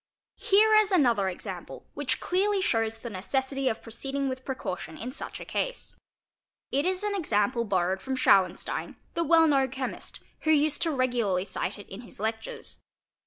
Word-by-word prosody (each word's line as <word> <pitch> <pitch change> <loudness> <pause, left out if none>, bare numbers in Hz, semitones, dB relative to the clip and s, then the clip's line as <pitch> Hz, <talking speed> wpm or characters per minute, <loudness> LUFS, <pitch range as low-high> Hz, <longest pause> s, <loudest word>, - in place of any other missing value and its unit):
| - - -66
4 - - -11
Here 430 +2 +6
is 425 -1 +4
another 240 - +3
example 180 - -7
which - - -1
clearly 395 +3 +1
shows 225 - +1
the 235 +1 -7
necessity 265 +7 -1
of 220 - -4
pro 230 - -10
ceeding 270 +4 -2
with 260 0 -5
precaution 185 - -5
in 245 +3 -5
such 275 - -7
a - - -8
case. - - -3 0.8
It 280 +5 +1
is 370 +2 -1
an 415 -1 0
example 235 - +1
borrowed 190 -1 0
from 265 +5 -2
Schauenstein, 190 -8 +2 0.2
the 335 - +1
well 330 +1 +6
known 270 -3 +3
chemist, 265 0 -5 0.2
who 315 - -2
used 300 -1 +3
regularly 245 - +1
to - - -10
cite - - -2
it 205 - -11
in 195 +4 -8
his 235 - -11
lectures. 220 +1 -4
260 Hz, 180 wpm, -28 LUFS, 220-315 Hz, 0.8 s, Here